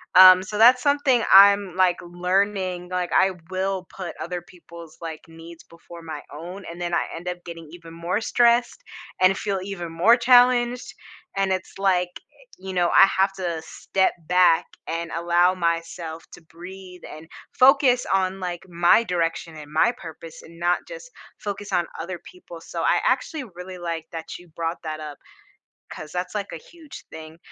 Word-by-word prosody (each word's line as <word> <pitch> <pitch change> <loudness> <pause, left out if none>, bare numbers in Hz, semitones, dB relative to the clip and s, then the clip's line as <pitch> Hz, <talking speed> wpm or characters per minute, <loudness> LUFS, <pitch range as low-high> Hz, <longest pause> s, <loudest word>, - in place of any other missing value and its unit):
Um, 185 0 +9
so 210 +2 -6
that's 250 +3 +6
something 285 -4 +2
I'm, 200 -1 +7
like, 185 -1 +3
learning 180 +1 -1
like, 180 -1 -3
I 190 0 +4 0.2
will 190 0 -2
put 180 -3 -6
other 180 0 -5
people's, 170 -2 -14
like, 160 -2 -7
needs 165 +1 -13
before 170 0 -14
my 160 -3 -7
own, 175 +6 -9
and 170 +1 -9
then 175 0 -3
I - - 0
end 170 +2 -9
up 180 0 -5
getting 165 -2 -9
even 170 -1 -12
more 170 +4 -2
stressed, 240 - +2 0.4
and 185 +1 +4
feel 200 -2 -2
even 175 -4 -6
more 200 +9 +4
challenged, 245 0 +3 0.4
and 195 -1 +1
it's, 185 - -6
like, 185 -2 +1 0.2
eh, - - -22
you 190 0 -8
know, 175 -1 +2
I - - +7
have 195 +1 +1
to 175 -4 -4
step 190 +3 -1
back, 180 -2 +4 0.2
and 165 0 -4
allow 175 +2 +2
myself 165 -1 -3
to - - -12
breathe, 180 +2 -12
and 155 +1 -11 0.3
focus 260 -1 +5
on, 190 0 0
like, 175 -1 -5
my 175 +6 +4
direction, 165 -4 -2
and 150 0 -11
my 160 +9 +3
purpose, 165 -3 -11
and 165 +1 -15
not 175 +1 +1
just - - -10 0.3
focus 205 0 -6
on 175 - 0
other 175 +1 -6
people, 350 - -13
so - - -6
I - - +3
actually 310 -5 0
really 180 +1 -9
like 165 -2 -5
that 165 -1 -7
you 175 - -17
brought 165 +1 -4
that 155 -1 -5
up, 150 -2 -8 0.7
'cause 155 -1 -9
that's, 180 +2 -4
like, 205 -1 -4
a - - -5
huge 315 - -13
thing. 160 +1 -11
180 Hz, 175 wpm, -23 LUFS, 170-195 Hz, 0.7 s, Um